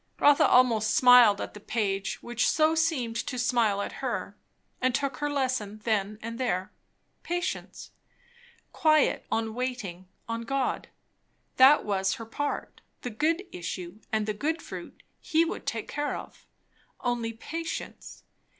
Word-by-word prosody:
Rotha 290 -1 +6
almost 230 -4 +4
smiled 245 -5 +7
at - - -5
the 210 - -10
page 200 -2 -2
which 240 0 +1
so 310 +1 +3
seemed 305 -8 0
to 250 - -3
smile 235 -5 +2
at - - -5
her; - - -3 0.5
and 255 -1 +2
took 275 +1 -1
her 295 0 -1
lesson 255 -7 -1
then 210 -2 0
and 230 +1 -5
there. 190 -8 -1 0.5
Patience. 350 +1 -4 0.8
Quiet 310 -2 +3
on 225 -1 0
waiting 215 -8 -4 0.2
on 230 0 -3
God. 265 +2 -1 0.7
That 270 +3 +7
was 195 -2 0
her 225 - -8
part; 290 +6 -4 0.2
the 245 - -5
good 320 - 0
issues 180 +3 -6
and 215 -1 +1
the 215 - -1
good 310 +10 -1
fruit - - -9 0.2
he 325 +1 +2
would - - -5
take 225 -2 -2
care 290 0 -2
of. - - -12 0.5
Only 240 -2 -1
patience! 325 +9 -6
240 Hz, 140 wpm, -28 LUFS, 215-285 Hz, 0.8 s, smiled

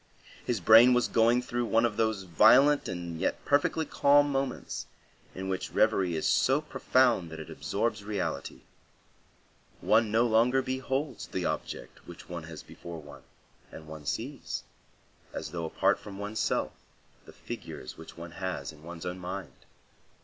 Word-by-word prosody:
His 120 -4 -1
brain 115 +6 +7
was 125 - +2
going 115 +2 +3
through 120 -1 -2
one 115 +1 +3
of 115 -3 -1
those 110 -3 0
violent 110 - +5
and 85 -3 -5
yet - - -2
perfectly 145 +3 +2
calm 145 0 +4
moments 135 -1 -3 0.5
in 95 +1 -5
which 95 -1 -3
reverie 95 -6 +2
is 80 - -2
so 135 +2 +3
profound 130 - +2
that 80 0 -8
it 80 - -8
absorbs 110 0 -2
reality. 100 -2 -4 1.2
One 110 0 +3
no 115 +3 +3
longer 120 +3 +3
beholds 130 +2 -3
the - - -3
object - - -5
which 85 -1 -11
one 85 -2 -6
has 80 -1 -9
before 85 -1 -9
one, 75 -1 -12 0.5
and 80 - -10
one 75 -2 -9
sees, 130 +4 -4 0.7
as - - -5
though 85 -1 -3
apart 80 - +1
from 100 -2 -10
one's 105 +2 -4
self, - - 0 0.6
the - - -11
figures 65 - -8
which - - -12
one 85 0 -8
has 95 0 -4
in 75 -1 -17
one's 85 +1 -9
own 90 +1 -4
mind. 90 +1 -6
110 Hz, 155 wpm, -29 LUFS, 85-125 Hz, 1.2 s, brain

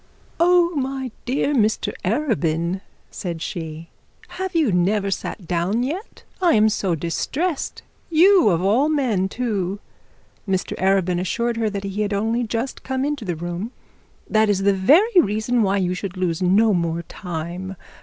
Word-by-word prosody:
'Oh, 350 0 +4
my 265 -2 -2
dear 275 +3 0
Mr 220 -4 +1
Arabin,' 185 - 0 0.3
said 170 -3 -5
she, 160 -1 -6 0.4
'have 375 -1 -5
you 310 -9 +3
never 195 +3 +1
sat 190 -1 -4
down 180 +7 0
yet? 345 - -5 0.2
I 350 -2 +4
am 215 0 +5
so 195 -5 0
distressed. 270 - -2 0.3
You 350 - +6
of 170 -1 +1
all 235 +10 +3
men 235 -11 +1
too.' 205 -5 -2 0.7
Mr 190 -1 -1
Arabin 190 -2 +2
assured 235 +6 -1
her 225 -1 +1
that 200 -1 -4
he 200 +1 -3
had 205 -1 -1
only 225 +4 0
just 235 +3 -3
come 265 +1 -2
into 290 -6 -3
the 175 -3 -2
room. 175 +8 -5 0.5
'That 215 0 +3
is 195 -1 +1
the 200 0 +4
very 345 - +5
reason 220 +2 0
why 200 -1 +2
you 180 -2 0
should 185 0 -5
lose 175 -2 -1
no 205 +4 +4
more 170 -1 -1
time. 180 +2 -6
205 Hz, 155 wpm, -22 LUFS, 180-260 Hz, 0.7 s, You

